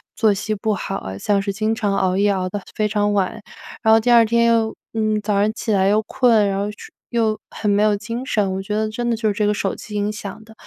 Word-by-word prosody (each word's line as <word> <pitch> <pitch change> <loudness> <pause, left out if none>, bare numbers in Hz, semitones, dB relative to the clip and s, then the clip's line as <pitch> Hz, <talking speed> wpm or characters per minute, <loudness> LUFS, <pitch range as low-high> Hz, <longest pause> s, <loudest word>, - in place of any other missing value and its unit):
作 215 -2 +3
息 210 +2 -3
不 215 +1 -1
好 195 0 -4
啊， 95 - -7
像 200 - +1
是 200 0 -2
经 215 +2 -1
常 205 -4 -1
熬 185 -1 +1
夜 200 +1 +3
熬 185 -1 -1
得 205 +2 -4
非 215 -1 +1
常 205 0 0
晚。 200 +2 -1 0.4
然 220 - +3
后 225 - +6
第 240 +2 +1
2 235 -1 +7
天 235 +1 +2
又， 230 -1 +2 0.2
嗯， 215 -1 0
早 210 0 -1
上 210 +1 +2
起 225 - -3
来 195 -2 +3
又 210 +2 +3
困， 225 -3 +3
然 195 0 -1
后 205 - -1
去 210 - -13 0.2
又 225 -3 0
很 210 - -3
没 205 +1 +3
有 210 -1 +3
精 230 +4 -5
神， 200 -6 0
我 190 - -3
觉 210 +2 -4
得 215 0 0
真 240 +2 -2
的 230 - +1
就 220 0 -1
是 - - 0
这 205 0 0
个 210 - +2
手 195 -1 -2
机 210 - -9
影 205 0 0
响 210 0 -8
的。 220 0 -16
210 Hz, 285 characters per minute, -20 LUFS, 200-220 Hz, 0.4 s, 2